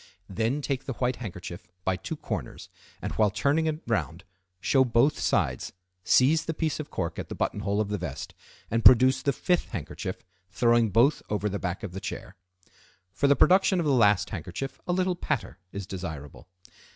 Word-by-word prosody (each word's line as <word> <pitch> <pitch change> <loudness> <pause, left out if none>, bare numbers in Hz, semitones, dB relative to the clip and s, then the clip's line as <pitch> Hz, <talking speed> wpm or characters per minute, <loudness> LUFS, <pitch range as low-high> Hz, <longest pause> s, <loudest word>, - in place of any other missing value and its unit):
Then 115 +9 -1
take 135 -2 -2
the 135 - -3
white 125 +1 -1
handkerchief 90 -4 -7 0.2
by 95 -1 +1
two 95 - -5
corners, - - -6 0.3
and, - - -2
while 105 -1 +3
turning 140 +10 +1
it 155 0 -3
round, 95 -6 -2 0.4
show 135 +6 +3
both 125 +4 +2
sides, 65 -1 0 0.3
seize 145 - +4
the 165 - -3
piece 160 -1 -1
of 150 - -5
cork 85 -1 -3
at - - -6
the - - -5
buttonhole 100 +1 -1
of 105 -1 0
the 105 -1 -2
vest, - - -6 0.4
and 115 +1 0
produce 130 +2 +7
the 140 - +1
fifth 180 +6 0
handkerchief, 95 - -5 0.3
throwing 115 +3 +3
both 120 +9 +3
over 105 0 -1
the 100 0 -3
back 90 -1 -4
of 105 - -5
the 95 +2 -7
chair. - - -6 0.8
For 140 - +2
the 140 - +5
production 190 +2 +4
of 170 - 0
the 145 - +2
last 105 -6 +3
handkerchief 90 - -5
a - - +1
little 185 0 +1
patter 145 - -3
is 100 -1 -5
desirable. 80 -7 -7
115 Hz, 185 wpm, -27 LUFS, 95-140 Hz, 0.8 s, produce